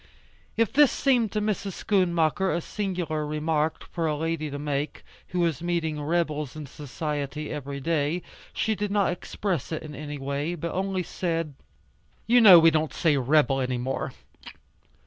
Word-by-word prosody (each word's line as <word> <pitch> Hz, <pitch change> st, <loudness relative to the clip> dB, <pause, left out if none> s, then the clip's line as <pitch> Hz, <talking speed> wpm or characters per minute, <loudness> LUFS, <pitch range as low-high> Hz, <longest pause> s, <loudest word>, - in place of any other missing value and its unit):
If 230 Hz, 0 st, +2 dB
this 290 Hz, -1 st, +6 dB
seemed 245 Hz, -6 st, +2 dB
to 215 Hz, -, +1 dB
Mrs. 205 Hz, -2 st, -2 dB
Schoonmaker 180 Hz, -2 st, +1 dB
a -, -, 0 dB
singular 175 Hz, -5 st, -3 dB
remark 155 Hz, +1 st, -1 dB
for 165 Hz, -2 st, -1 dB
a 150 Hz, -1 st, 0 dB
lady 160 Hz, -1 st, -2 dB
to 145 Hz, -, -5 dB
make, 145 Hz, 0 st, -3 dB, 0.2 s
who 180 Hz, -, -3 dB
was 165 Hz, -5 st, 0 dB
meeting 165 Hz, -3 st, -1 dB
"rebels" 150 Hz, -3 st, -1 dB
in 155 Hz, -1 st, -6 dB
society 150 Hz, +1 st, -4 dB
every 140 Hz, -1 st, -5 dB
day, 160 Hz, +3 st, 0 dB, 0.3 s
she 220 Hz, -, 0 dB
did 210 Hz, 0 st, -2 dB
not 200 Hz, -2 st, +2 dB
express 180 Hz, -2 st, -3 dB
it 160 Hz, -, -3 dB
in 150 Hz, -1 st, -8 dB
any 145 Hz, +1 st, -6 dB
way, 140 Hz, +5 st, -2 dB
but 170 Hz, 0 st, -4 dB
only 190 Hz, 0 st, -1 dB
said, 165 Hz, -3 st, -2 dB, 0.7 s
"You 240 Hz, +1 st, +5 dB
know 195 Hz, -6 st, +11 dB
we 165 Hz, 0 st, +7 dB
don't 155 Hz, 0 st, 0 dB
say 160 Hz, -3 st, +3 dB
'rebel' 135 Hz, 0 st, +3 dB
anymore. 125 Hz, 0 st, -2 dB
160 Hz, 160 wpm, -26 LUFS, 150-180 Hz, 0.7 s, know